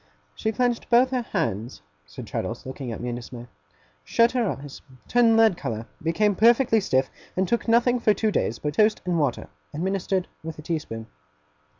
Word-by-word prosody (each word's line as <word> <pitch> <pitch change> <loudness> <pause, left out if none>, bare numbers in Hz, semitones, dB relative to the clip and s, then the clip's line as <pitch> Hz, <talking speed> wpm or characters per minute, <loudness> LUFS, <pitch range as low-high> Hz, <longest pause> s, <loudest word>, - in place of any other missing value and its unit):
'She 220 - -2
clenched 240 +1 -1
both 250 +2 +5
her 255 -1 0
hands,' 110 - -3 0.2
said 75 - -9
Traddles, - - -4
looking 130 -1 -6
at 115 - -5
me 125 - -4
in 120 - -3
dismay; 120 0 -9 0.6
'shut 230 +1 +3
her 240 -5 0
eyes; 140 0 -7 0.3
turned 235 -2 +4
lead 225 -4 +5
colour; 115 -9 -4 0.2
became 200 +6 +2
perfectly 230 +3 +4
stiff; 130 -9 0 0.3
and 190 0 +2
took 235 +2 -1
nothing 240 +2 +3
for 225 - +3
two 220 -1 0
days 115 - 0
but 150 0 -3
toast 215 +5 +3
and 175 -2 0
water, 140 -5 -1 0.3
administered 190 +2 -1
with 160 0 -7
a 155 - -10
tea 165 0 -1
spoon. 115 -6 -8
190 Hz, 185 wpm, -25 LUFS, -, 0.6 s, both